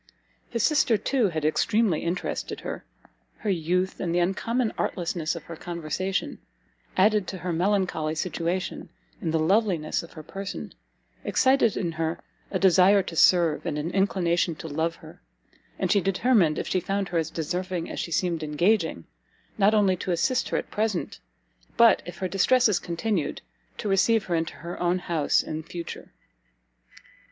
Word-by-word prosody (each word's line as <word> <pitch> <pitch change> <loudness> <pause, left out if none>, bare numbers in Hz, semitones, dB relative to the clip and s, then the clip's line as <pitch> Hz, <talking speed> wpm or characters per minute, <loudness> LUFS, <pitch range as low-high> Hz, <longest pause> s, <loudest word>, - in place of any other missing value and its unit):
His 230 -2 -1
sister, 290 -7 +3
too, 245 -2 +1
had 155 -3 -3
extremely 210 +3 +2
interested 175 +2 -3
her; - - -6 0.5
her 210 - -1
youth, 180 +2 0
and 170 -2 -1
the - - +3
uncommon 220 +6 0
artlessness 170 -2 -2
of 170 - -7
her 170 - -8
conversation, 175 +3 -3 0.6
added 205 0 +3
to 190 - -5
her 180 -1 -3
melancholy 180 -3 0
situation, 175 +2 -3 0.3
and 165 - -1
the 160 - +2
loveliness 175 -1 +1
of 170 - -13
her 155 - -9
person, 195 +5 -6 0.5
excited 260 -5 +3
in 170 - -1
her 160 0 -2 0.3
a - - -1
desire 190 +1 +5
to 170 - -7
serve, 170 -1 +4
and 150 - -2
an 155 +3 -3
inclination 180 -3 +1
to 160 - -8
love 160 +2 -1
her; - - -14 0.6
and - - 0
she 200 - +4
determined, 195 -4 +2
if - - -3
she 185 - +1
found 195 +1 -2
her 170 - +1
as 160 -1 -2
deserving 175 +2 -3
as - - -6
she - - -3
seemed 170 0 0
engaging, 160 - +1 0.5
not 205 +2 +5
only 200 -3 +4
to 185 - -6
assist 245 +9 +1
her - - 0
at - - -5
present, 210 -4 -2 0.6
but, 230 -4 +6
if 175 - -8
her 185 - -2
distresses 210 +3 +3
continued, 175 0 -2 0.3
to - - -4
received 200 +3 +3
her 175 - -2
into 165 -1 -1
her 170 +2 -7
own 175 +1 +2
house 170 -5 +1
in 155 0 -4
future. 170 +1 -8
180 Hz, 165 wpm, -26 LUFS, 165-200 Hz, 0.6 s, but